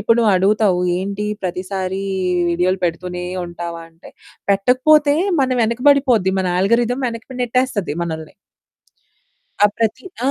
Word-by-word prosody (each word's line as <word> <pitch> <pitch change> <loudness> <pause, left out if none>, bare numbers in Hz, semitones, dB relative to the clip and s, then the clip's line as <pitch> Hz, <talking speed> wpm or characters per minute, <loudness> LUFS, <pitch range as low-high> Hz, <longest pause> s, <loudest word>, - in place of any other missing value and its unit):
ఇప్పుడు 230 +3 +3
నువ్వడుగుతావు 200 -2 +3 0.2
ఏంటి 200 +2 -3 0.2
ప్రతిసారి 185 +1 -3 0.5
వీడియోలు 180 +2 +1
పెడుతూనే 180 +1 -3 0.2
ఉంటావా? 170 -1 -6
అంటే 165 +1 -16 0.4
పెట్టకపోతే 270 +9 +4 0.3
మన 265 - +2
వెనక 230 +2 -1
పడిపోద్ది 250 -9 +2
మన 185 - -1
ఆల్గోరిథమ్ 235 +6 +1
వెనక్కి 235 +2 -8
నెట్టేస్తది 245 - -1
మనల్ని. 160 -2 -6 1.3
ఆహ్, 205 - +6
ప్రతి 225 - -1 0.2
ఆ! - - +3
200 Hz, 115 wpm, -19 LUFS, 180-240 Hz, 1.3 s, ఆహ్